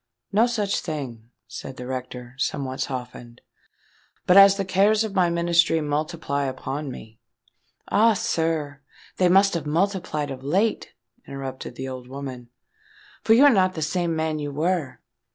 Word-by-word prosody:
"No 220 +4 +4
such 210 -4 -1
thing," 120 -7 -6 0.2
said 135 - -8
the 125 - -7
rector, 125 -1 -6
somewhat 130 -1 -2
softened. 125 -2 -6 0.9
"But 180 - +4
as 195 0 +8
the 195 - -2
cares 200 +4 +3
of 215 -3 -4
my 180 -3 +3
ministry 170 -1 +2
multiply 150 -1 -2
upon 135 +2 -4
me——" 110 -3 -11 0.7
"Ah! 225 +2 +4
sir, 160 -9 -2 0.4
they 180 -1 +3
must 195 +2 +5
have 160 -3 -3
multiplied 165 -3 -1
of 130 0 -8
late," 195 +10 0 0.3
interrupted 135 -2 -7
the 130 +2 -5
old 130 -1 -7
woman; 130 -2 -8 0.7
"for 220 - +5
you're 285 +4 +7
not 185 -4 +2
the 160 - -2
same 170 +1 -1
man 160 -1 -1
you 145 -1 -4
were." 160 0 -2
155 Hz, 150 wpm, -24 LUFS, 135-185 Hz, 0.9 s, as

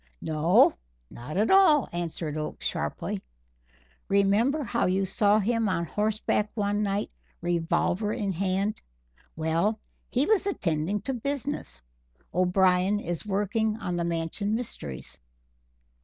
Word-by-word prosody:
"No, 160 +3 +4 0.4
not 140 +8 -7
at 215 +2 +2
all," 320 - +6
answered 165 -3 -3
Oakes 155 0 -5
sharply. - - -2 0.9
"Remember 205 +9 +2
how 235 -4 0
you 190 +1 +1
saw 205 +2 +3
him 225 +1 +1
on 170 -2 0
horseback 210 +2 0
one 205 -1 0
night, 200 0 -1 0.3
revolver 175 +4 0
in 200 -2 -1
hand. 195 +3 -1 0.5
Well, 165 +7 0 0.3
he 260 +3 +1
was 415 0 +2
attending 185 - -1
to 270 - -2
business. 275 - -4 0.5
_O'Brien 185 +2 +3
is 175 0 -4
working 210 +2 0
on 180 -6 -3
the 175 - -1
Mansion 170 +5 -1
mysteries. 70 - -6
200 Hz, 120 wpm, -27 LUFS, 170-220 Hz, 0.9 s, all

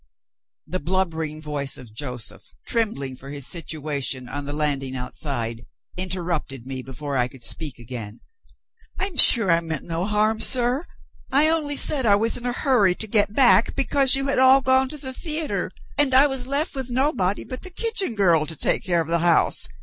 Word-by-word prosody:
The 185 +3 -3
blubbering 160 -3 -2
voice 145 -2 -3
of 120 -4 -12
Joseph, 125 -2 -7
trembling 140 - -2
for 135 +2 -11
his 140 -2 -6
situation, 145 -6 -3
on 145 +3 -5
the 145 - -5
landing 140 -3 -2
outside, 125 -2 -5 0.3
interrupted 170 -8 -3
me 130 -1 -5
before 135 +3 -5
I 125 -1 +2
could 130 -1 -14
speak 150 +2 -3
again. 115 -3 -7 0.8
"I'm 385 -3 -3
sure 230 -8 +6
I 165 - +4
meant 160 -3 -5
no 170 +3 -3
harm, 215 +1 +1
sir. 255 +5 +4 0.4
I 295 +4 +4
only 305 -3 -1
said 275 -4 +1
I 200 - +6
was 225 +3 +1
in 245 - -3
a - - 0
hurry 240 -8 +2
to 220 - -4
get 205 -1 +2
back, 245 -4 +5
because 275 -1 +4
you 270 0 -1
had 275 -2 0
all 260 +1 +6
gone 260 0 +2
to 300 - -7
the 260 -2 -7
theater, 310 +2 -3 0.3
and 275 -3 +3
I 270 +2 +7
was 270 -3 -1
left 280 +3 -2
(with 265 -3 -4
nobody 240 -7 0
but 255 - -8
the 370 - -7
kitchen 390 - -1
girl) 170 -6 +3
to 160 - -2
take - - +2
care 175 -2 +1
of 160 - -5
the 170 +1 +1
house. 170 0 +2
185 Hz, 190 wpm, -23 LUFS, -, 0.8 s, I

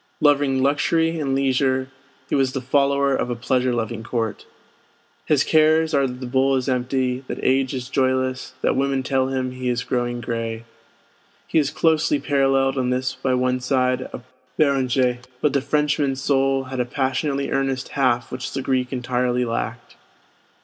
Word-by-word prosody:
Loving 140 -3 +3
luxury 165 +4 +1
and 135 -3 -1
leisure, 130 -1 +1 0.4
he - - -5
was 135 -2 +2
the 135 - -1
follower 140 +1 +2
of 125 - -2
a 120 - -1
pleasure 125 +1 0
loving 115 -1 -2
court. 115 -2 -3 0.8
His 145 -3 +3
cares 160 +1 +3
are 140 -2 +3
that 125 0 -7
the - - -4
bowl 135 +2 +2
is 130 0 -1
empty, 130 0 -1
that - - -4
age 135 0 +2
is 125 -1 -5
joyless, 130 -1 -1
that - - +2
women 135 -1 0
tell 130 0 +1
him 130 -1 -2
he 130 0 -3
is 120 0 -1
growing 120 -1 -2
gray. 115 -1 -4 0.8
He - - +2
is 145 -2 +1
closely 160 -2 +2
paralleled 135 -2 +1
in 125 -1 0
this 130 +1 -1
by 130 0 -1
one 125 0 +1
side 130 0 +1
of 120 - -8 0.3
Béranger; 130 -4 +2 0.2
but 145 +1 +1
the 140 - +2
Frenchman's 145 -2 0
soul 135 -1 +1
had 130 0 -6
a 125 - +1
passionately 135 +2 -1
earnest 135 -1 -1
half 130 -3 0
which 130 0 -5
the 135 - -3
Greek 130 -1 0
entirely 125 -1 0
lacked. 115 0 -4
130 Hz, 170 wpm, -22 LUFS, 125-140 Hz, 0.8 s, Loving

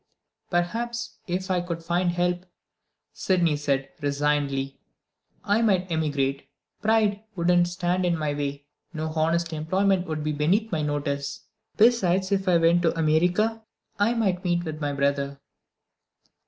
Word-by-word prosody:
"Perhaps, 235 +7 -2
if 185 +1 -2
I 180 -1 +2
could 170 -1 -5
find 175 +2 +1
help," 175 +1 -1 0.7
Sydney 175 -5 +1
said 140 -2 -1
resignedly, 140 -1 0 0.6
"I 205 +3 +2
might 190 -5 +2
emigrate. 145 -4 -1 0.3
Pride 210 -1 +2
wouldn't 175 0 +3
stand 175 +1 -1
in 175 -2 +1
my 150 -2 -1
way; 145 0 -4 0.3
no 160 0 -2
honest 165 +1 0
employment 185 +4 +1
would 155 -1 -3
be 155 - 0
beneath 180 +10 +1
my 160 -3 0
notice. 140 -1 -2 0.4
Besides, 195 -5 +3
if 195 -1 0
I 180 -2 +5
went 165 +1 +4
to 165 -1 +1
America, 180 +8 +2 0.4
I 220 +4 +3
might 190 -6 0
meet 175 -1 +1
with 155 -2 -6
my 145 -1 0
brother." 140 0 -1
170 Hz, 140 wpm, -25 LUFS, 150-185 Hz, 0.7 s, I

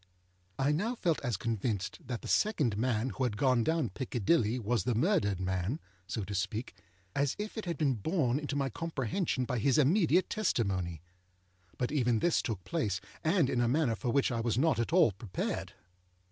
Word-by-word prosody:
I 135 +2 +2
now 210 +11 0
felt 170 -8 0
as 120 -5 -1
convinced 110 -3 -2
that 120 -3 -4
the - - -6
second 150 - +2
man 120 +2 0
who 130 - -3
had 115 -5 -1
gone 130 -3 +3
down 160 -3 +1
Piccadilly 120 - +1
was 115 -3 0
the 120 - 0
murdered 120 - +2
man 95 - -1 0.3
(so 110 - -3
to 100 - -6
speak), 100 +6 -2 0.4
as 140 -1 +1
if 210 +1 -5
it 220 - -4
had 170 -3 -2
been 140 -2 +2
borne 130 - 0
into 145 -1 -4
my 135 -2 0
comprehension 150 - -1
by 125 -1 -1
his 130 +3 +3
immediate 170 +4 +4
testimony. 95 - -1 0.7
But 125 - -1
even 125 -6 +2
this 170 +9 +2
took 105 -8 -4
place, 95 +2 -1 0.2
and 160 -2 +3
in 125 -2 0
a 120 - +2
manner 130 -2 +2
for 125 - -3
which 135 +1 +2
I 115 - -1
was 115 -1 0
not 140 -3 +3
at 115 - -1
all 170 - +5
prepared. 100 0 -4
125 Hz, 190 wpm, -31 LUFS, 110-155 Hz, 0.7 s, all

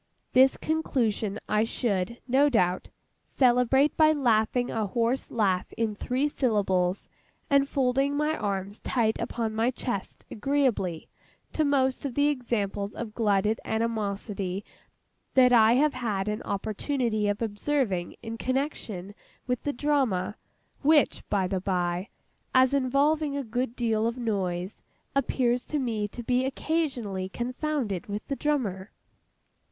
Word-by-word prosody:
This 260 +1 +6
conclusion 235 -10 -1
I 210 +1 +2
should, 225 -2 -1
no 275 +3 +4
doubt, 185 -8 +1 0.4
celebrate 255 +3 +3
by 310 -1 +5
laughing 245 -3 +1
a 220 -2 -1
hoarse 235 +5 0
laugh 195 -5 0
in 225 -2 -1
three 255 +7 -1
syllables, 200 -9 0 0.4
and 280 0 +4
folding 270 +1 +1
my 300 +1 +1
arms 200 -2 -3
tight 225 -3 0
upon 225 -2 -2
my 225 +2 +2
chest 240 -6 -5
agreeably 230 - 0 0.5
to 310 - +1
most 265 -3 +1
of 275 -4 -4
the 290 +1 +3
examples 210 -7 -2
of 225 -2 -6
glutted 210 -1 +1
animosity 205 -3 -2 0.7
that 250 -1 +6
I 225 -1 +6
have 285 +4 +3
had 215 -6 -2
an 210 +1 -2
opportunity 215 +2 -1
of 205 0 0
observing 210 -4 -1
in 230 0 -6
connexion 250 -8 -3 0.3
with 250 -1 -1
the 290 - -2
Drama—which, 275 +3 0
by 190 -2 +1
the 185 0 -2
by, 180 0 -1 0.5
as 260 +1 +5
involving 280 +2 +2
a 280 - -2
good 245 +1 -2
deal 225 -2 +1
of 235 +2 -3
noise, 190 -5 -2 0.3
appears 250 -2 +1
to 305 - -1
me 225 -6 -1
to 240 +4 -8
be 250 +2 +1
occasionally 260 - -2
confounded 250 - -3
with 205 +1 -5
the 275 - 0
Drummer. 225 -11 -1
235 Hz, 130 wpm, -27 LUFS, 205-270 Hz, 0.7 s, This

